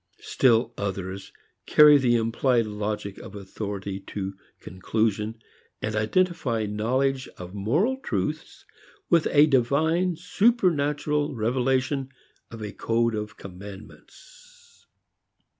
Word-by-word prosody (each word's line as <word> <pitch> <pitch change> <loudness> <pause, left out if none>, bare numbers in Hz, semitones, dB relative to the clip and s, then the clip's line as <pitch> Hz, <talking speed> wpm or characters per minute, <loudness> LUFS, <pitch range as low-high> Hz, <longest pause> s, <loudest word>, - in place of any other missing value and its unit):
Still 120 -2 +2
others 95 -1 -4 0.4
carry 150 -1 +7
the 120 -3 +3
implied 115 +1 +1
logic 105 -1 -4
of 100 - -10
authority 100 0 -5
to 95 -1 -4 0.3
conclusion, 110 +3 -2 0.4
and 110 0 -3
identify 120 -1 0
knowledge 130 +6 0
of 90 0 -9
moral 150 - +1
truths 270 - -4 0.5
with 170 -2 +4
a 145 +1 +6
divine 160 +7 +2
supernatural 155 - +1
revelation 130 +4 0 0.4
of 115 -2 -8
a 105 - -5
code 115 +2 0
of 105 -1 -5
commandments. 475 - -14
120 Hz, 100 wpm, -25 LUFS, 105-150 Hz, 0.5 s, carry